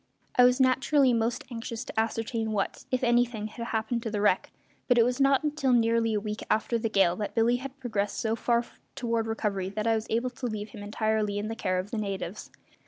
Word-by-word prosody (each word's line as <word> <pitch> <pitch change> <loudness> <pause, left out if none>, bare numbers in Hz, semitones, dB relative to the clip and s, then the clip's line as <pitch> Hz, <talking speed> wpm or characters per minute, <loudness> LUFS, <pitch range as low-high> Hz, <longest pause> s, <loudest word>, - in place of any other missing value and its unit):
I 250 - +7
was 250 +1 +4
naturally 265 +1 +4
most 230 +1 0
anxious 230 0 -5
to - - -3
ascertain 225 0 -1
what, 200 -2 -2
if 255 0 -1
anything 240 -2 +2
had 235 +2 -6
happened 225 +1 -1
to 230 - -3
the 210 -1 -2
wreck, 205 -2 +2 0.4
but 245 - +4
it 230 - +6
was 250 +2 0
not 275 0 +4
until 290 -4 +1
nearly 230 -1 +3
a - - +2
week 210 +1 -5
after 230 +2 +1
the 225 - -1
gale 195 -4 +3
that 210 - -4
Billy 235 +1 +3
had 270 +2 -8
progressed 210 -5 -2
so 225 0 0
far 235 +1 +1 0.3
toward 230 -2 -1
recovery 205 -4 -2
that 210 +2 -3
I 225 - +3
was 220 0 -2
able 235 +3 0
to 245 0 -4
leave 215 -2 -4
him 205 - -10
entirely 210 0 -1
to 210 - -3
the 225 - -4
care 185 -4 -1
of 185 +3 -3
the 225 - -2
natives. 195 -1 -4
225 Hz, 225 wpm, -28 LUFS, 215-245 Hz, 0.4 s, I